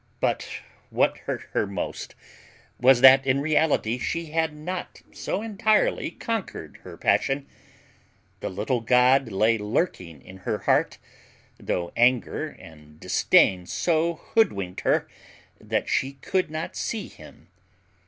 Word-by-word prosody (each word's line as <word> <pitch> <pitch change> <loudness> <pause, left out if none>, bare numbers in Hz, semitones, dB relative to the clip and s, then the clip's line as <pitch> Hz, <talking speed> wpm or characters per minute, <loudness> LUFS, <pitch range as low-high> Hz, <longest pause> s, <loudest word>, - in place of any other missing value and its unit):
But - - -1 0.4
what - - +2
hurt - - -3
her 105 - +1
most 95 -2 -5 0.6
was, 125 0 +5
that 135 0 +8
in 135 0 +1
reality 145 -6 +1
she 170 +3 -3
had 160 -1 0
not 175 +5 -6
so 200 - -4
entirely 215 0 +1
conquered 210 - -5
her - - -11
passion; 135 +1 +1 0.9
the - - -4
little 110 +6 -2
god 125 +1 +3
lay 110 +3 +2
lurking 105 - -2
in 95 - -12
her 95 - -3
heart, - - +1 0.6
though 85 -1 -3
anger 120 0 +2
and 75 -1 -16
distain 90 +1 +3
so 170 - 0
hood 225 +7 +1
winked 95 -2 -6
her, - - +1 0.5
that - - -2
she 135 +1 0
could 185 +6 -2
not 155 +1 -5
see 220 -4 -3
him. - - -16
130 Hz, 130 wpm, -25 LUFS, 105-160 Hz, 0.9 s, that